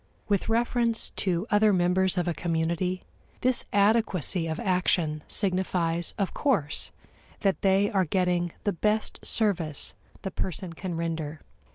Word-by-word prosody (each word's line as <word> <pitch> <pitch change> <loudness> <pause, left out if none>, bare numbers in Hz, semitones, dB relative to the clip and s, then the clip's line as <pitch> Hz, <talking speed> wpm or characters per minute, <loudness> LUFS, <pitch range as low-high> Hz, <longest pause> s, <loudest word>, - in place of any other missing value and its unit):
With 200 +1 0
reference 235 0 +1
to 180 0 -1
other 210 0 +5
members 185 0 +2
of 175 -1 0
a 175 - +1
community, 170 +2 -1 0.4
this 255 -1 +4
adequacy 200 - +2
of 160 0 -3
action 175 -4 +1
signifies, 180 -3 0
of 195 -3 -1
course, 160 - 0 0.5
that 195 -3 +1
they 195 +1 +3
are 190 -2 +2
getting 175 0 0
the 205 - 0
best 210 +5 -1
service 175 -9 0 0.3
the 190 - -3
person 185 -1 -4
can 175 0 -5
render. 160 -2 -3
185 Hz, 135 wpm, -27 LUFS, 170-205 Hz, 0.5 s, other